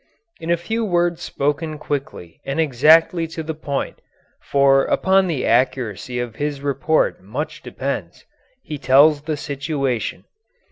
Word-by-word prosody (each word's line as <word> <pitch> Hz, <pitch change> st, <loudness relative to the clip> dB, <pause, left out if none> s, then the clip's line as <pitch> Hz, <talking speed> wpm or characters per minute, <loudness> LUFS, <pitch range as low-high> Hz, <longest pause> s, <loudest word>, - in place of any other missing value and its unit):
In 165 Hz, -, -6 dB
a 170 Hz, -, +3 dB
few 225 Hz, +7 st, -2 dB
words 175 Hz, -4 st, +1 dB
spoken 150 Hz, +2 st, -2 dB
quickly 140 Hz, -, -5 dB
and 135 Hz, +3 st, -3 dB
exactly 160 Hz, +4 st, +4 dB
to 160 Hz, 0 st, -6 dB
the 160 Hz, +1 st, -4 dB
point 145 Hz, -3 st, -4 dB, 0.4 s
for 135 Hz, -1 st, +3 dB
upon 190 Hz, 0 st, +3 dB
the 155 Hz, -7 st, -1 dB
accuracy 125 Hz, -1 st, 0 dB
of 120 Hz, -2 st, -5 dB
his 145 Hz, -1 st, -3 dB
report 145 Hz, -1 st, +1 dB
much 120 Hz, +11 st, -5 dB
depends -, -, -5 dB, 0.4 s
he 150 Hz, -2 st, -6 dB
tells 145 Hz, +3 st, +5 dB
the 155 Hz, 0 st, -3 dB
situation. 140 Hz, -4 st, -3 dB
145 Hz, 135 wpm, -21 LUFS, 135-160 Hz, 0.4 s, tells